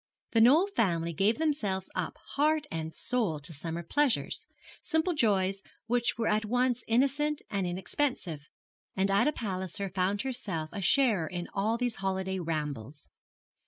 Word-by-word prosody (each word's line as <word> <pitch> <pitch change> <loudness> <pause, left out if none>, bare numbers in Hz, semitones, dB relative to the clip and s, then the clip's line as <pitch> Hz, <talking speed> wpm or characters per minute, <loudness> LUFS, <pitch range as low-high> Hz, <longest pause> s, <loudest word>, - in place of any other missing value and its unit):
The 225 - +4
Knoll 285 +11 +7
family 170 - 0
gave 200 +7 +2
themselves 225 -12 0
up - - -3
heart 300 +1 +2
and 160 -1 -3
soul 215 -7 0
to 165 +3 -8
summer 165 +3 -4
pleasures 280 - 0 0.3
simple 345 +1 +1
joys 195 - +2 0.2
which 240 +1 +1
were 230 - 0
at 215 +1 +2
once 245 +2 +1
innocent 280 +5 +1
and 195 -3 0
inexpensive 175 - -2 0.5
and 195 +1 +1
Ida 200 +10 +4
Palliser 190 - -3
found 190 +3 0
herself 200 -12 -2
a 205 - -4
sharer 205 - +3
in 175 +1 -4
all 215 +4 +1
these 245 -1 -1
holiday 190 0 -1
rambles. 150 -5 -4
200 Hz, 145 wpm, -30 LUFS, 175-250 Hz, 0.5 s, Knoll